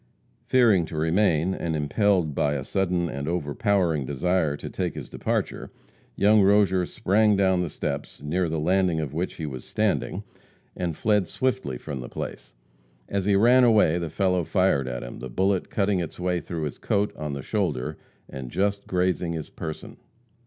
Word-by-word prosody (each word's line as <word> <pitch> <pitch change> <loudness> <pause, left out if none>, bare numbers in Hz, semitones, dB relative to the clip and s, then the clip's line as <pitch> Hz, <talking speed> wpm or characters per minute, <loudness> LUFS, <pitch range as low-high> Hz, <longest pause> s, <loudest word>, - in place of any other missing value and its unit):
Fearing 115 -8 +4
to 80 0 -7
remain, 85 +1 +2
and 85 -3 -2
impelled 85 +2 +1
by 70 +1 +1
a 70 - -3
sudden 90 0 0
and 70 -2 -5
overpowering 85 0 0
desire 75 +2 0
to - - -7
take - - -3
his - - -6
departure, - - -2 0.5
young 105 +1 +5
Rozier 95 -2 +4
sprang 105 +2 +2
down 95 -2 +3
the 90 - -2
steps, - - -4
near 85 +5 -1
the 80 - -2
landing 90 0 +2
of 75 -3 -4
which 85 +4 -2
he 80 - -5
was 65 -4 -6
standing, 105 -2 -1 0.5
and 85 -4 -3
fled 105 -4 +2
swiftly 130 - -1
from 70 +1 -6
the - - -7
place. - - -7 0.5
As 100 -2 -1
he 100 -1 +3
ran 120 +5 +6
away, 105 -8 +4
the 85 -2 -3
fellow 90 +2 +1
fired 90 -7 +1
at 60 -1 -4
him, - - -8
the 65 - -6
bullet 95 +8 0
cutting 100 -2 +1
its 85 -1 -5
way 90 0 0
through 85 -2 -5
his 75 - -4
coat 105 +1 0
on 75 -2 -4
the 70 -1 -5
shoulder, 85 - -1 0.3
and 65 -2 -7
just 100 +6 -1
grazing 90 -2 0
his 80 -2 -6
person. 80 -2 -7
90 Hz, 175 wpm, -25 LUFS, 75-100 Hz, 0.5 s, ran